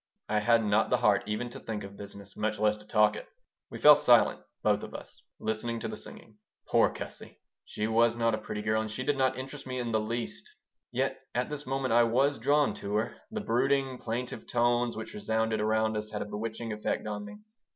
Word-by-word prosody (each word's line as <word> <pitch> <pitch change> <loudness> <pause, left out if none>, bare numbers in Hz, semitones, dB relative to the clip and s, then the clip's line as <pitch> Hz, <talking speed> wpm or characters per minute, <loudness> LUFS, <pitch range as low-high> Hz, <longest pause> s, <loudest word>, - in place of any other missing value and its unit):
I 105 0 +1
had 115 +1 +3
not 105 +1 +2
the 125 - +3
heart 105 -5 +3
even 115 +3 -2
to - - -8
think 110 -2 -5
of 100 0 -9
business, 100 -1 -10
much 110 0 -1
less 105 0 +2
to 105 0 -16
talk 105 -1 +4
it. - - -8 0.4
We - - -7
fell - - +9
silent, - - +4 0.2
both - - +3
of - - -8
us, - - -10 0.2
listening 110 +2 -2
to - - -2
the - - -5
singing. 105 -1 -12 0.3
Poor - - +4
Gussie! - - -9 0.3
She 105 - -3
was 115 +1 +3
not 115 -1 +2
a - - 0
pretty 105 - -5
girl, 110 +1 +1
and 110 - -4
she 110 +4 -4
did 145 - +1
not 130 -1 +1
interest 135 +1 -7
me 130 0 -3
in 120 -2 -2
the 110 - +2
least. 110 -9 -4 0.4
Yet - - -1 0.2
at 125 +4 -1
this 150 -1 -5
moment 135 -2 0
I 120 - +6
was 135 +4 +2
drawn 145 +4 +3
to 100 +1 -4
her. 110 +2 -1
The 220 -1 -4
brooding, 135 - +1
plaintive 120 +2 -4
tones 120 -1 +1
which 110 0 -6
resounded 110 +1 0
around 110 0 +1
us 105 0 -3
had 105 -1 -3
a - - -9
bewitching 110 +2 -4
effect 105 +1 -2
on 105 -1 -4
me. 105 - -9
110 Hz, 220 wpm, -29 LUFS, 105-125 Hz, 0.4 s, fell